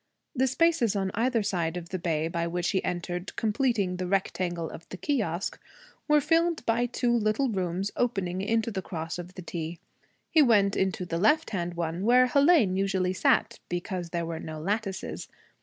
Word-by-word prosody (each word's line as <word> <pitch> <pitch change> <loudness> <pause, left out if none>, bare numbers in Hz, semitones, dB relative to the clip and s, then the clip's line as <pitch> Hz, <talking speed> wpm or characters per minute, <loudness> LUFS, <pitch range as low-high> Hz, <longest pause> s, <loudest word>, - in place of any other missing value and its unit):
The 260 +1 +2
spaces 290 - +2
on 195 -1 0
either 230 0 +1
side 175 -4 -1
of 170 -1 -7
the 185 - -3
bay 160 -2 0
by 170 0 -2
which 175 +1 -1
he 190 - 0
entered, 175 +1 -4
completing 215 -5 0
the 180 0 -3
rectangle 180 -3 -1
of 165 - -11
the 185 - -7
kiosque, 195 - -1 0.5
were 300 -1 +5
filled 330 0 +1
by 235 +2 +2
two 245 0 0
little 225 +4 +1
rooms 190 -1 -2
opening 190 -7 -1
into 225 +2 0
the 195 -2 -3
cross 165 -1 -5
of 175 +1 -8
the 185 - -8
T. 165 0 -5 0.5
He 320 - +6
went 205 -7 +4
into 190 -1 0
the 170 -1 -2
left 300 - +3
hand 175 -3 -2
one, 170 +1 -2
where 250 +3 +6
Hélène 280 - +4
usually 190 -1 0
sat - - +2
because 175 0 -3
there 170 0 -2
were 165 -1 -4
no 155 -1 -6
lattices. 195 +3 -3
190 Hz, 180 wpm, -28 LUFS, 175-230 Hz, 0.5 s, He